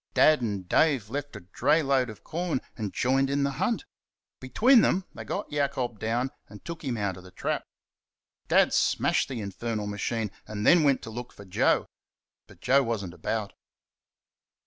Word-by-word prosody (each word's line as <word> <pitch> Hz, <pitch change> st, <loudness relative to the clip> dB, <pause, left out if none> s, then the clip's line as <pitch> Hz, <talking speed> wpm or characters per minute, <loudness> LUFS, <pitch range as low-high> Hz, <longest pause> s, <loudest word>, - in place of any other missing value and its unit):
Dad 155 Hz, -3 st, +5 dB
and 100 Hz, -5 st, -3 dB
Dave 130 Hz, -, +2 dB
left 145 Hz, +1 st, -4 dB
a -, -, -8 dB
dray 150 Hz, -, +1 dB
load 135 Hz, -3 st, +2 dB
of 110 Hz, -, -11 dB
corn 170 Hz, -3 st, -2 dB, 0.2 s
and 105 Hz, -4 st, -4 dB
joined 135 Hz, +2 st, +1 dB
in 140 Hz, 0 st, +1 dB
the 140 Hz, -, +1 dB
hunt. 230 Hz, +3 st, 0 dB, 0.5 s
Between 230 Hz, -, +5 dB
them 185 Hz, -2 st, +2 dB
they -, -, -8 dB
got 200 Hz, -, -4 dB
Jacob 130 Hz, -6 st, -1 dB
down 120 Hz, +4 st, -1 dB, 0.2 s
and 105 Hz, 0 st, -13 dB
took 170 Hz, -1 st, -7 dB
him 125 Hz, -5 st, -2 dB
out 100 Hz, -4 st, -2 dB
of 90 Hz, -, -12 dB
the 90 Hz, -, -12 dB
trap. 90 Hz, -, -3 dB, 0.8 s
Dad -, -, +4 dB
smashed -, -, +2 dB
the 125 Hz, -4 st, -4 dB
infernal 105 Hz, +2 st, -4 dB
machine, 105 Hz, +1 st, -2 dB, 0.2 s
and 105 Hz, 0 st, -4 dB
then 175 Hz, -1 st, +7 dB
went 140 Hz, -3 st, +2 dB
to 110 Hz, -, -7 dB
look 120 Hz, +2 st, -7 dB
for 100 Hz, -, -13 dB
Joe. 95 Hz, -, +2 dB, 0.6 s
But -, -, -18 dB
Joe 135 Hz, +2 st, +4 dB
was 115 Hz, -6 st, -2 dB
n't 85 Hz, -, -8 dB
about. 100 Hz, +5 st, -3 dB
120 Hz, 180 wpm, -27 LUFS, 105-140 Hz, 0.8 s, then